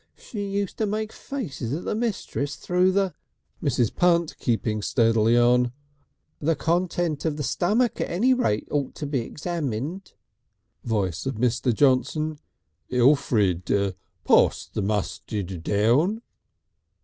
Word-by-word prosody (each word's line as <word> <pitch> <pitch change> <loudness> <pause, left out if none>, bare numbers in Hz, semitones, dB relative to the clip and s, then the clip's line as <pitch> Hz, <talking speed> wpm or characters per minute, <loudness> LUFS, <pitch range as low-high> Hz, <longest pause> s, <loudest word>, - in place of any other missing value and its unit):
She 205 -3 -6
used 200 -1 -3
to 220 - +1
make 215 +1 -2
faces 145 - -5
at 165 - -4
the - - -1
mistress 205 -10 -2
through 180 +5 +2
the 195 -1 +1 0.2
" - - -22
Mrs. 125 -6 +1
Punt 170 -2 +2
keeping 110 -3 0
steadily 115 0 +3
on: 120 0 +4 0.7
"The 160 +2 +1
contents 170 0 0
of 155 -2 0
the 150 - -3
stummik 215 - +1
at - - -2
any 230 +10 +3
rate 110 - 0
ought 145 -3 -1
to 150 - -5
be 140 -2 -1
examined." 150 - -4 0.7
Voice 100 -2 -1
of 135 - -2
Mr. 125 +2 +1
Johnson. 145 +5 +1 0.5
"Elfrid, 105 - +2 0.3
pass - - +4
the - - -1
mustid 100 -2 -3
down." 130 - +2
140 Hz, 130 wpm, -25 LUFS, 115-180 Hz, 0.7 s, on